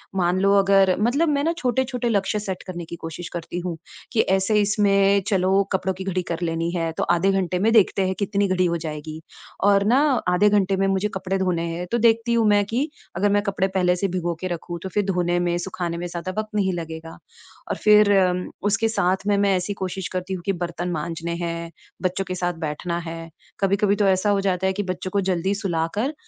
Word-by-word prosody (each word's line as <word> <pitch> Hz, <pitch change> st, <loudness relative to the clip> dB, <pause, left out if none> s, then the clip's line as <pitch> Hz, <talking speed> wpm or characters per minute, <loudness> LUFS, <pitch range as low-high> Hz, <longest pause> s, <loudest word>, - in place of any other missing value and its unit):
मान 180 Hz, 0 st, +1 dB
लो 200 Hz, 0 st, +4 dB
अगर 195 Hz, -1 st, +4 dB
मतलब 280 Hz, +9 st, +2 dB
मैं 285 Hz, -1 st, +1 dB
ना 330 Hz, -, +1 dB
छोटे-छोटे 250 Hz, -2 st, -1 dB
लक्ष्य 205 Hz, -1 st, 0 dB
सेट 190 Hz, -3 st, -5 dB
करने 175 Hz, -2 st, -6 dB
की 170 Hz, -, -7 dB
कोशिश 165 Hz, +1 st, -7 dB
करती 170 Hz, 0 st, -4 dB
हूँ 170 Hz, -2 st, -3 dB, 0.4 s
कि 220 Hz, -, +4 dB, 0.2 s
ऐसे 210 Hz, +3 st, +2 dB
इसमें 200 Hz, -1 st, +3 dB
चलो 195 Hz, -1 st, +3 dB
कपड़ों 190 Hz, 0 st, 0 dB
की 190 Hz, -, -7 dB
घड़ी 185 Hz, -1 st, -1 dB
कर 165 Hz, -, -2 dB
लेनी 165 Hz, 0 st, -1 dB
है, 165 Hz, -1 st, -1 dB
तो -, -, -3 dB
आधे 175 Hz, +3 st, +2 dB
घंटे 185 Hz, -2 st, 0 dB
में 220 Hz, +4 st, +3 dB
देखते 195 Hz, -3 st, +4 dB
हैं 190 Hz, -, -1 dB
कितनी 200 Hz, 0 st, +1 dB
घड़ी 185 Hz, -1 st, +1 dB
हो 170 Hz, -1 st, 0 dB
जाएगी। 155 Hz, -1 st, -6 dB, 0.4 s
और 200 Hz, 0 st, +4 dB
ना 270 Hz, -, +5 dB, 0.3 s
आधे 190 Hz, +4 st, +4 dB
घंटे 195 Hz, -2 st, +2 dB
में 195 Hz, 0 st, +2 dB
मुझे 195 Hz, +1 st, +1 dB
कपड़े 190 Hz, 0 st, -2 dB
धोने 175 Hz, -3 st, 0 dB
हैं, 180 Hz, +1 st, -4 dB
तो 235 Hz, -, +2 dB
देखती 230 Hz, 0 st, +3 dB
हूँ 230 Hz, -2 st, +3 dB
मैं 205 Hz, 0 st, +4 dB
कि 250 Hz, +9 st, -1 dB, 0.3 s
अगर 200 Hz, +4 st, +2 dB
मैं 205 Hz, 0 st, +3 dB
कपड़े 195 Hz, -2 st, 0 dB
पहले 180 Hz, -2 st, +1 dB
से 195 Hz, +2 st, -1 dB
भिंगो 175 Hz, -2 st, -2 dB
के 185 Hz, -, -2 dB
रखूँ, 175 Hz, 0 st, -5 dB
तो 190 Hz, -, -4 dB
फिर 205 Hz, +2 st, 0 dB
धोने 175 Hz, -1 st, 0 dB
में, 175 Hz, 0 st, 0 dB
सुखाने 175 Hz, -1 st, -4 dB
में 175 Hz, -, -4 dB
ज़्यादा 175 Hz, +1 st, -5 dB
वक्त 215 Hz, 0 st, -2 dB
नहीं 190 Hz, -3 st, +1 dB
लगेगा। 165 Hz, -1 st, -6 dB, 0.6 s
और -, -, 0 dB
फिर 210 Hz, -1 st, +6 dB
अम 180 Hz, -1 st, +2 dB, 0.2 s
उसके 225 Hz, +2 st, +2 dB
साथ 190 Hz, -4 st, +1 dB
में 205 Hz, -1 st, +3 dB
मैं 200 Hz, -1 st, +3 dB
ऐसी 185 Hz, +3 st, -3 dB
कोशिश 190 Hz, -1 st, -4 dB
करती 185 Hz, +1 st, -3 dB
हूँ 185 Hz, -, -4 dB
कि 195 Hz, -, +1 dB
बर्तन 175 Hz, 0 st, -4 dB
माँजने 165 Hz, +1 st, -3 dB
हैं, 170 Hz, -1 st, -4 dB, 0.3 s
बच्चों 185 Hz, +1 st, -1 dB
के 185 Hz, -, -4 dB
साथ 175 Hz, -1 st, -1 dB
बैठना 165 Hz, +3 st, -3 dB
है। 165 Hz, 0 st, -7 dB, 0.3 s
कभी-कभी 200 Hz, +1 st, +2 dB
तो 205 Hz, 0 st, +1 dB
ऐसा 190 Hz, +2 st, +2 dB
हो 200 Hz, -1 st, +2 dB
जाता 190 Hz, -1 st, 0 dB
है 190 Hz, -, +1 dB
कि 205 Hz, -, -2 dB
बच्चों 185 Hz, 0 st, -4 dB
को 200 Hz, -, +1 dB
जल्दी 185 Hz, 0 st, 0 dB
सुलाकर, 195 Hz, -, -1 dB
190 Hz, 220 wpm, -23 LUFS, 175-200 Hz, 0.6 s, फिर